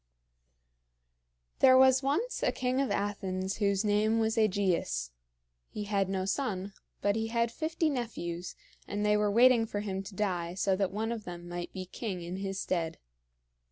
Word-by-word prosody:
There 260 -1 +7
was 260 0 +6
once 295 - -1
a - - +2
king 255 +1 0
of 275 - 0
Athens 190 -2 -2
whose 200 -1 +1
name 210 +2 +2
was 220 0 +1
AEgeus. 185 - +1 0.6
He 210 - -5
had 200 -2 0
no 190 -1 -1
son; 195 -4 -2 0.3
but 205 0 +2
he 225 0 -1
had 235 0 0
fifty 320 +4 -1
nephews, 205 - -3 0.3
and 205 +1 -2
they 210 0 +4
were 210 0 +2
waiting 235 +1 +5
for 205 -1 -3
him 195 -2 -3
to 195 0 -10
die, 180 -4 -1
so 190 0 +1
that 195 -1 0
one 220 +3 -2
of 225 -3 -5
them 175 -1 -7
might 175 0 -5
be 185 -1 -6
king 185 -1 -5
in 175 +2 -5
his 195 0 -3
stead. 170 -4 -1
205 Hz, 170 wpm, -30 LUFS, 185-225 Hz, 0.6 s, There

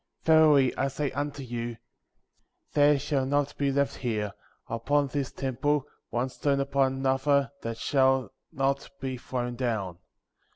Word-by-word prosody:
Verily 155 -5 +5
I 135 - +1
say 140 +1 -2
unto 145 0 -3
you, 120 -1 -4 1.0
there 145 0 +5
shall 140 -1 0
not 145 +1 0
be 140 -1 +2
left 140 0 0
here, 105 -5 -2 0.3
upon 135 +5 +1
this 140 -1 -2
temple, 140 +2 0 0.2
one 125 +2 -1
stone 140 +1 0
upon 135 -1 +1
another 135 +1 +2
that 115 0 -4
shall 130 -3 +2 0.2
not 135 +1 -1
be 130 -1 -3
thrown 125 -1 -3
down. 105 -8 -2
135 Hz, 135 wpm, -28 LUFS, 125-140 Hz, 1.0 s, Verily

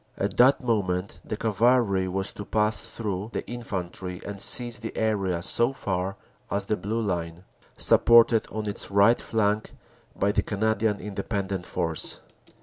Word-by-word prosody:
At 100 0 -2
that 135 +3 +5
moment 100 -6 -1
the 105 - -5
cavalry 110 -3 +2
was 95 +1 -2
to 105 - -8
pass 105 +1 +1
through 105 -2 -5
the - - -4
infantry 95 -6 -5
and 100 -1 -5
seize 120 -3 +3
the 110 0 -7
area 95 -6 0
so 120 +7 +2
far 95 -5 -3 0.3
as 100 0 -2
the 105 - 0
Blue 105 +4 -3
Line, 85 -3 -3 0.3
supported 115 -1 +6
on 110 0 -4
its 100 - -3
right 100 +4 +4
flank 105 -1 -1 0.4
by 100 - +1
the - - +1
Canadian 110 0 0
Independent 100 -2 -4
Force. 80 -1 0
105 Hz, 145 wpm, -26 LUFS, 95-110 Hz, 0.4 s, supported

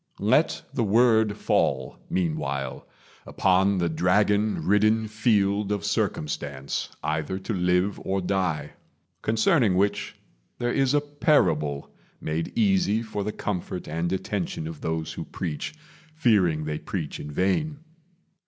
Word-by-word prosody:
Let - - +2
the - - 0
word 110 -1 +3
fall, 65 -9 0
Meanwhile, 70 -7 -2 0.4
upon 95 +1 +2
the 85 -1 +1
dragon 100 +6 +2
ridden 110 +2 +3
field 105 -2 +1
Of 100 -4 -1
circumstance, 70 -2 -2
either 80 +4 -1
to 95 +4 -4
live 90 +1 +1
or 95 +1 0
die; 90 -6 -1 0.5
Concerning 110 - +3
which 100 +2 0 0.4
there 120 0 -1
is 135 0 +2
a 145 - +4
parable, 80 - +1 0.3
Made 80 +1 -3
easy 190 - +2
for 105 -2 -4
the 105 - -2
comfort 90 -3 -4
and 85 +3 -2
attention 95 -3 -2
Of 80 -2 -7
those 80 -1 -2
who - - -5
preach, 85 - -5 0.4
fearing 100 - +3
they 75 0 -3
preach - - -4
in 75 - -7
vain. 100 - 0
95 Hz, 125 wpm, -26 LUFS, 80-110 Hz, 0.5 s, a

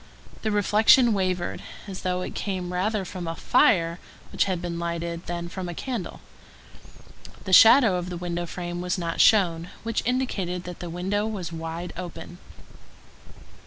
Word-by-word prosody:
The 220 - -1
reflection 215 +3 +5
wavered, 185 -3 -1 0.2
as 195 -2 -7
though 180 0 -1
it - - -6
came 185 -3 -3
rather 195 +2 -1
from 180 -1 -6
a 165 - -3
fire 175 - +3 0.3
which - - +2
had 185 -3 -1
been 170 -1 -4
lighted 170 0 -4
than 170 0 -4
from 180 0 -6
a 175 - -6
candle. 240 -4 -5 1.2
The 190 - -3
shadow 225 -2 +8
of 180 0 -4
the 175 - -5
window 175 0 -3
frame 175 0 -5
was 180 +1 -1
not 170 -2 -1
shown, 175 -5 +4
which 230 -1 -1
indicated 200 -8 -1
that 180 -1 -8
the 175 - -6
window 195 +5 -1
was 190 -6 -5
wide 165 +2 -5
open. 175 0 -8
180 Hz, 160 wpm, -25 LUFS, 170-205 Hz, 1.2 s, shadow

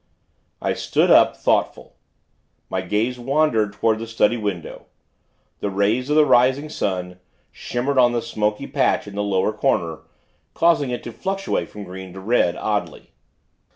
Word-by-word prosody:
I - - +1
stood - - +1
up, - - +5
thoughtful. - - -1 0.8
My 95 - -1
gaze 110 +7 -1
wandered 120 -5 +1
toward 110 +1 0
the 115 - -6
study 115 0 +2
window. 100 -7 -5 0.7
The 100 - -2
rays 105 +7 0
of 150 - +2
the 155 -1 +6
rising 130 +4 +3
sun, 90 -8 -3 0.3
shimmered 130 +3 -2
on 120 -1 +5
the 120 -1 -2
smoky 105 -2 -2
patch - - +1
in 105 - -10
the 100 - -2
lower 100 +1 0
corner, 85 - 0 0.6
causing 165 -5 +3
it 125 - -4
to 120 - -7
fluctuate 195 - -3
from 105 - -9
green 95 -1 -9
to 95 - -9
red, 95 -4 +1
oddly. 105 -1 -3
110 Hz, 155 wpm, -21 LUFS, 100-125 Hz, 0.8 s, the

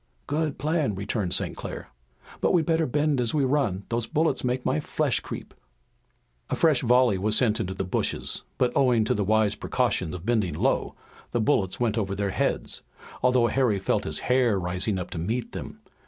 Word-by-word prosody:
"Good 150 0 -1
plan!" 150 - 0
returned 100 -1 -2
St. - - 0
Clair. - - -7 0.5
"But - - +2
we'd 165 -3 +3
better 165 -1 +2
bend 145 +1 +1
down - - +3
as 120 +4 0
we 145 -3 +2
run. 125 -9 0
Those 115 -1 -1
bullets 160 +1 +1
make 125 0 -1
my 75 - +1
flesh - - 0
creep!" - - -8 1.0
A - - 0
fresh 155 -6 +3
volley 125 -5 +4
was 105 +2 +2
sent 115 -3 +2
into 95 -3 -3
the 95 - -2
bushes, 90 - -1 0.2
but 125 -1 +1
owing 125 -4 +4
to 110 - +1
the 105 - 0
wise 110 0 +2
precaution 80 - -1
of 90 +1 -8
bending 105 -9 +1
low, - - 0 0.4
the 120 - +1
bullets 105 -6 +1
went 115 -2 +1
over 100 -2 -2
their 100 0 -1
heads, - - -1 0.4
although 125 -1 +4
Harry 120 -4 +2
felt 95 - 0
his - - -2
hair 125 -5 +2
rising 90 +3 -1
up 90 - -5
to 85 - -4
meet 115 +8 -2
them. - - -8
115 Hz, 195 wpm, -26 LUFS, 100-130 Hz, 1.0 s, volley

